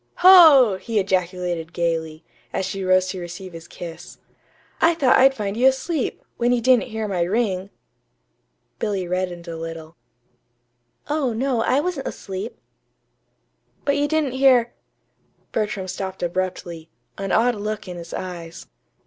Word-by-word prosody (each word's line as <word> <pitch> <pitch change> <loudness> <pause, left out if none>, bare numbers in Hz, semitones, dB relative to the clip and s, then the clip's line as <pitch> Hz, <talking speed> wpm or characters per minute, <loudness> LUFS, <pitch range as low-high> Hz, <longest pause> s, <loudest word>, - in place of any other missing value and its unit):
"Ho!" 300 - +8
he 230 -2 -3
ejaculated 180 -3 -1
gayly, 165 -2 -2 0.3
as 190 - -2
she 190 +1 -4
rose 185 0 +3
to 185 - -4
receive 175 +1 -8
his 165 0 -10
kiss. 170 -2 -9 0.6
"I 335 +1 +4
thought 275 -6 +4
I'd 270 +1 +5
find 205 -3 -3
you 250 +3 +4
asleep, 265 +2 -1
when 240 +1 +1
you 245 - +2
didn't 250 +1 +3
hear 220 -1 -3
my 185 -4 -1
ring." 190 0 0 1.1
Billy 200 -4 -2
reddened 180 -1 -3
a 165 - -5
little. 165 0 -8 1.1
"Oh, 290 -5 0
no, 245 0 0
I 265 +5 +2
wasn't 325 -4 -3
asleep." 195 +4 -6 1.3
"But 280 - +2
you 290 0 +1
didn't 310 -3 0
hear 255 -2 +4 0.4
" - - -42
Bertram 210 -3 -2
stopped 190 0 -5
abruptly, 175 -2 -3 0.3
an 195 -1 -3
odd 240 +2 +3
look 210 -1 -5
in 180 -1 -7
his 170 0 -9
eyes. 175 -3 -7
195 Hz, 145 wpm, -22 LUFS, 175-245 Hz, 1.3 s, Ho